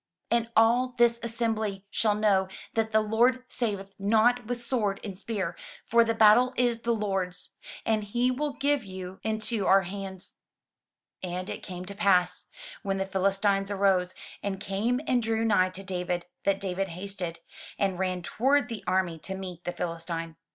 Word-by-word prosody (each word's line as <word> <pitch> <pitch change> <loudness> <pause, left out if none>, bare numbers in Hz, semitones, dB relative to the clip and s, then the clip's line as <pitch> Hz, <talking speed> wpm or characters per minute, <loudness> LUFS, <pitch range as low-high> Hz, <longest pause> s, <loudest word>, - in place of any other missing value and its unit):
And 235 -1 +2
all 245 +3 +4
this 235 0 +4
assembly 220 -4 -2
shall 215 -2 +2
know 200 -3 +3 0.3
that 220 -1 0
the 220 0 +4
Lord 240 +4 +2
saveth 200 -4 -3
not 225 +4 +3
with 245 0 -2
sword 225 -5 0
and 200 -3 -5
spear: 190 -3 -3 0.3
for 235 0 +5
the 230 0 0
battle 225 +4 +6
is 240 -2 +2
the 235 0 -1
Lord's, 195 -5 -2 0.3
and 220 -1 +1
he 240 +5 +1
will 290 +3 -2
give 285 -2 +1
you 185 -1 -8
into 220 -1 -1
our 195 0 +6
hands." 190 0 -7 0.8
And 180 0 -4
it - - -6
came 180 -1 -7
to 200 - -7
pass, 185 -3 +2 0.3
when 195 0 -1
the 195 - -1
Philistine 195 +1 +1
arose, 190 -2 +2 0.3
and 195 -1 -3
came 215 +6 0
and 250 -1 +2
drew 225 0 0
nigh 185 -4 +4
to 185 +1 -7
David, 180 -2 -2 0.2
that 195 0 +2
David 195 0 -1
hasted, 180 -2 -5 0.4
and 190 -2 0
ran 185 -2 -1
toward 265 +6 +2
the 225 -4 -5
army 180 -3 +1
to 190 +5 -6
meet 180 -2 -7
the 175 - -1
Philistine. 165 -1 -4
200 Hz, 165 wpm, -28 LUFS, 185-230 Hz, 0.8 s, battle